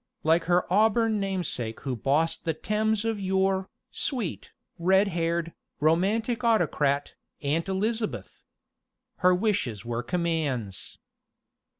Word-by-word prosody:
Like 165 +1 +3
her 175 +1 +3
auburn 220 +1 +3
namesake 180 - -3
who 135 -2 -2
bossed 155 +7 +1
the 165 -2 -1
Thames 215 +4 0
of 225 -2 -1
yore, 190 0 +1 0.2
sweet, 240 - -3 0.3
red 190 +4 +4
haired, 170 -1 -1 0.3
romantic 210 - +1
autocrat, 150 -10 +1 0.3
Aunt 160 +6 0
Elizabeth! 215 +3 -2 0.8
Her 180 -1 +4
wishes 180 - -1
were 120 0 -2
commands. 150 - -2
180 Hz, 105 wpm, -27 LUFS, 155-210 Hz, 0.8 s, red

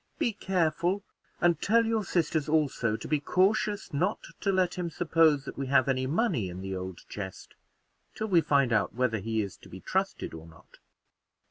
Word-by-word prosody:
Be 230 - 0
careful, 180 0 0 0.4
and 170 -3 +3
tell 230 +2 +3
your 225 -1 0
sisters 160 -5 0
also 140 -8 +1
to - - -8
be 150 -1 +1
cautious 205 +6 +1
not 160 +6 +1 0.2
to 200 - +1
let 185 -2 +2
him 180 -2 -3
suppose 160 -3 +3
that - - -7
we 135 - -2
have 130 -1 +4
any 130 -1 0
money 155 - 0
in 90 +1 -7
the 95 0 -4
old 95 -1 -6
chest, 95 -3 -7 0.6
till 215 - -2
we 180 -6 +4
find 140 -5 +2
out 110 - +1
whether 125 -3 +1
he 110 +2 -1
is 100 - -7
to - - -16
be 95 - -9
trusted 190 - -2
or 80 0 -9
not." 80 0 -19
155 Hz, 190 wpm, -29 LUFS, 115-185 Hz, 0.6 s, have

